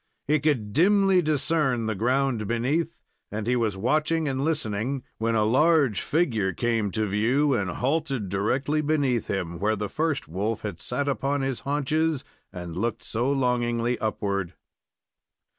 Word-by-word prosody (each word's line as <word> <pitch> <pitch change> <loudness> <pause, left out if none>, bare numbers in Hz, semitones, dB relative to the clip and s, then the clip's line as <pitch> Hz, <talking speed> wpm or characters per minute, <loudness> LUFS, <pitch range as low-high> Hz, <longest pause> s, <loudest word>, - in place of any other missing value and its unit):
He 150 +2 +3
could 130 -9 0
dimly 195 +3 +4
discern 150 -5 +1
the 110 - 0
ground 120 +1 0
beneath, 140 +9 -1 0.3
and 105 +1 -3
he 125 +2 +2
was 110 -5 0
watching 155 +8 +1
and 135 0 -1
listening 130 -4 -1 0.2
when 115 +1 +1
a 110 - +3
large 135 - +3
figure 115 - +1
came 115 -3 0
to 110 - 0
view, 120 +8 +2
and 100 -6 0
halted 135 - -1
directly 130 +11 0
beneath 145 -6 +1
him, 85 -3 -3
where 105 +3 +1
the 105 -1 -4
first 155 - -1
wolf 100 +8 -2
had 100 -6 -5
sat 140 +3 -2
upon 140 +2 0
his 135 -2 -2
haunches 150 +1 0 0.3
and 90 -2 -7
looked 115 +6 -2
so 120 +5 -1
longingly 120 -2 0
upward. 100 -4 -2
125 Hz, 150 wpm, -26 LUFS, 105-145 Hz, 0.3 s, dimly